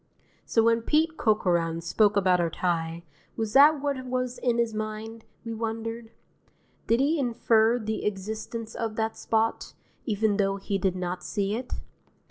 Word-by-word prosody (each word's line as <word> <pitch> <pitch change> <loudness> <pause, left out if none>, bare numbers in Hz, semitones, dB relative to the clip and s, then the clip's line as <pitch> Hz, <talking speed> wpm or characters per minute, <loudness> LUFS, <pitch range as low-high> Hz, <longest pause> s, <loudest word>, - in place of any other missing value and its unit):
So 225 - +3
when 230 0 +3
Pete 315 +6 +1
Corcoran 175 - +1
spoke 205 +5 +2
about 185 -2 +3
our 170 - +1
tie, 165 0 -2 0.3
was 220 -2 -2
that 290 +2 +7
what 280 -3 -1
was 255 0 -3
in 240 -2 +1
his 235 -1 +1
mind, 215 +1 -5 0.2
we 230 - -4
wondered? 225 0 -4 0.8
Did 230 +1 +3
he 295 +4 +2
infer 230 -2 +3
the 220 -2 -3
existence 215 +3 -4
of 225 -2 -3
that 220 0 -1
spot, 225 0 -1 0.3
even 210 -2 +1
though 195 -1 +1
he 195 0 -2
did 185 -1 0
not 180 0 -4
see 200 -1 -1
it? 250 +2 -5
220 Hz, 155 wpm, -27 LUFS, 200-235 Hz, 0.8 s, that